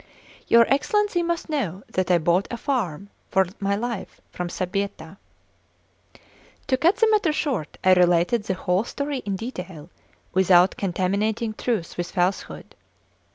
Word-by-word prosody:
Your 235 0 +6
Excellency 390 +7 +1
must 340 0 -2
know 210 - -3
that 185 -1 -2
I 180 - +5
bought 170 +4 +1
a 240 - -4
farm 205 - -2 0.2
for 190 0 +3
my 200 0 0
life 225 -2 -5
from 180 - -4
Sbietta 185 -1 -4 0.7
" - - -29
To 260 - +4
cut 330 +8 +3
the 455 -2 +3
matter 415 -7 +3
short, 265 - -2
I 185 - +6
related 180 +5 +3
the 190 - -1
whole 180 +2 0
story 280 +3 -3
in 200 - -1
detail, 185 - -7 0.4
without 185 -1 +5
contaminating 200 +4 -1
truth 215 -6 -3
with 175 0 -3
falsehood. 180 +1 -2
200 Hz, 145 wpm, -24 LUFS, 180-250 Hz, 0.7 s, Your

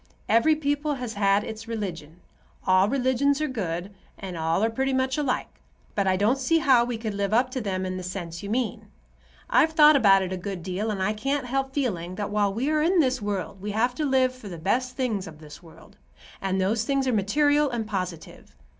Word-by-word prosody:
Every 230 +8 +4
people 290 0 -1
has 250 -4 -5
had 200 0 +2
its 220 +1 -7
religion. 180 -7 -6 0.4
All 185 +2 +4
religions 270 +2 +1
are 305 - 0
good, 190 - -4 0.2
and 185 -2 -7
all 165 +4 0
are 225 - +3
pretty 265 +3 -1
much 260 0 +1
alike. 285 -4 -2 0.3
But 200 -2 0
I 185 0 +2
don't 220 +7 +2
see 330 +5 +2
how 265 -7 +4
we 240 -1 -3
could 220 -2 -4
live 200 +1 0
up 250 +2 +2
to 255 - -3
them 190 -3 -2
in 185 0 -3
the - - -5
sense 175 -2 -6
you 200 - -6
mean. 235 +1 -2 0.6
I've 320 - +3
thought 305 -1 +7
about 195 -7 +5
it 185 0 -4
a - - -3
good 185 -1 -6
deal, 190 +4 -3
and 195 -3 -2
I 210 +2 +1
can't 275 +5 -2
help 270 +1 -2
feeling 185 -11 -2
that 205 +1 -4
while 205 -1 +1
we 250 +9 -1
are 305 -1 +2
in 350 +3 +3
this 260 -5 +2
world 200 -2 -4
we 210 - -4
have 240 +4 +1
to 305 - -3
live 260 -2 +2
for 255 -5 -11
the 175 - -7
best 250 +9 -1
things 220 -8 -1
of 155 -2 -11
this 150 +1 -13
world, 165 +4 -17 0.4
and 190 0 -1
those 210 +4 +1
things 275 +2 0
are 255 - +1
material 290 +8 +2
and 235 -3 -3
positive. 185 -6 -6
220 Hz, 220 wpm, -25 LUFS, 190-265 Hz, 0.6 s, thought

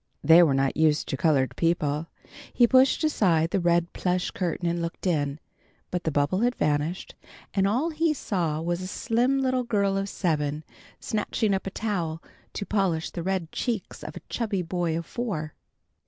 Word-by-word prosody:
They 165 +2 +8
were 150 -6 +4
not 135 0 +1
used 155 -1 +2
to - - -1
colored 135 -3 +2
people. 160 -2 0 0.4
He 240 - +5
pushed 260 +5 +4
aside 175 - +2
the 195 - +1
red 170 -1 +1
plush 180 0 -1
curtain 175 -1 -2
and 170 0 -1
looked 170 +3 -5
in, 145 -5 0 0.5
but 180 0 -3
the 160 - +1
bubble 145 +6 +1
had 245 +2 +1
vanished, 150 +4 -1 0.4
and 195 -1 +2
all 260 +11 +1
he 320 +1 +1
saw 175 - -1
was 175 +1 -1
a 185 - -5
slim 245 +6 +1
little 260 -1 +1
girl 200 -4 +1
of 195 0 -2
seven 150 -5 -1 0.4
snatching 215 -1 -1
up 190 0 -2
a - - 0
towel 180 -7 -2 0.3
to 200 - -4
polish 190 -7 0
the 175 - -5
red 185 -2 -2
cheeks 230 -6 -3
of - - -7
a - - -8
chubby 210 -6 -2
boy 170 -1 -1
of 170 - -4
four. 155 -9 -4
180 Hz, 180 wpm, -26 LUFS, 160-210 Hz, 0.5 s, They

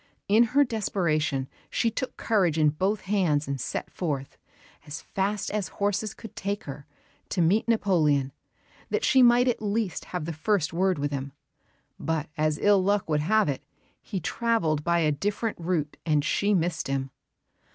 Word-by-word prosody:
In 220 +4 +5
her 285 - +8
desperation 165 - 0 0.2
she 230 - +1
took 255 +3 -4
her - - -10
courage 185 -8 +2
in 155 -1 +4
both 190 +8 -1
hands 180 -8 +1
and 140 -2 -3
set - - -4
forth, 140 -6 -3 0.5
as 150 +2 -5
fast 200 +1 -2
as 205 -3 -1
horses 205 +1 -1
could 225 - -11
take 200 +2 -3
her, 140 0 -8 0.4
to - - -2
meet 180 +8 +3
Napoleon, 155 - +2 0.6
that - - 0
she 265 -3 +5
might 245 +1 +6
at 245 - 0
least 210 -2 -1
have 180 -4 -4
the 165 - -3
first 165 0 0
word 185 +1 +2
with 145 0 -2
him; 135 -1 -4 0.7
but 160 -3 -2
as 155 -1 +1
ill 200 0 +4
luck 200 +1 +1
would 150 -2 +1
have 215 +6 +3
it, 140 -1 -2 0.4
he 195 - -4
travelled 165 -5 0
by 170 +1 +2
a 155 -2 +3
different 205 +8 -2
route 165 -4 -2
and 150 -2 +1
she 205 +5 +2
missed 170 -2 -1
him. 135 -1 -2
180 Hz, 170 wpm, -27 LUFS, 150-205 Hz, 0.7 s, her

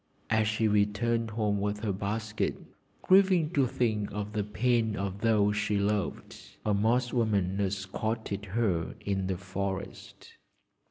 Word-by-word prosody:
As 110 -1 +3
she 110 +1 +1
returned 105 +3 +1
home 105 -2 0
with 105 0 -2
her 105 -3 -1
basket, 105 +2 -2 0.5
grieving 185 -4 +4
to 140 -6 +2
think 110 -4 -1
of 105 0 -4
the 105 -1 0
pain 110 +1 +1
of 100 +1 -4
those 105 -2 +3
she 105 0 0
loved, 100 -1 -2 0.2
a 105 - +2
Moss 120 +5 +1
woman 100 -5 +1
accosted 100 +2 -2
her 95 -5 -1
in 95 -2 -1
the 95 -1 -1
forest. 95 +1 -6
105 Hz, 140 wpm, -29 LUFS, 100-115 Hz, 0.5 s, grieving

